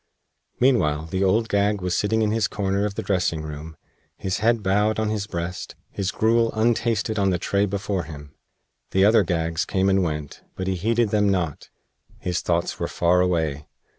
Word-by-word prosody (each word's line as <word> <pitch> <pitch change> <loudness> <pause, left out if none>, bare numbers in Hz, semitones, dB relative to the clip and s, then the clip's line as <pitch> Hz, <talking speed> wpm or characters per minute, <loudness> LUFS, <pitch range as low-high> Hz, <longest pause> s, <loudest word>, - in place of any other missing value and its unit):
Meanwhile 80 - +2
the 95 +1 0
Old 110 +4 +2
Gag 100 0 +1
was 90 -1 -1
sitting 110 +2 +1
in 105 - +1
his 110 -2 +1
corner 100 0 -1
of 100 -1 -3
the - - -3
dressing 90 -5 0
room, 75 +1 -8 0.4
his 95 0 -2
head 115 0 +2
bowed 105 +3 +2
on 110 -1 0
his 105 -2 -2
breast, 85 -1 -5 0.2
his 100 -2 -2
gruel 115 +2 +2
untasted 110 -1 +1
on 100 -1 +3
the 90 - +1
tray 100 +3 0
before 100 -2 -2
him. 75 -2 -10 0.6
The 95 +1 +3
other 110 +1 +6
Gags 85 -2 -1
came 95 0 +1
and 95 0 +3
went, 75 -4 -4
but 95 - -4
he 95 - 0
heeded 115 +5 +1
them 105 -1 +2
not. 85 -6 -2 0.5
His 90 -2 -2
thoughts 85 0 -1
were - - -1
far 90 +1 +2
away. 80 -5 0
95 Hz, 185 wpm, -23 LUFS, 85-105 Hz, 0.6 s, other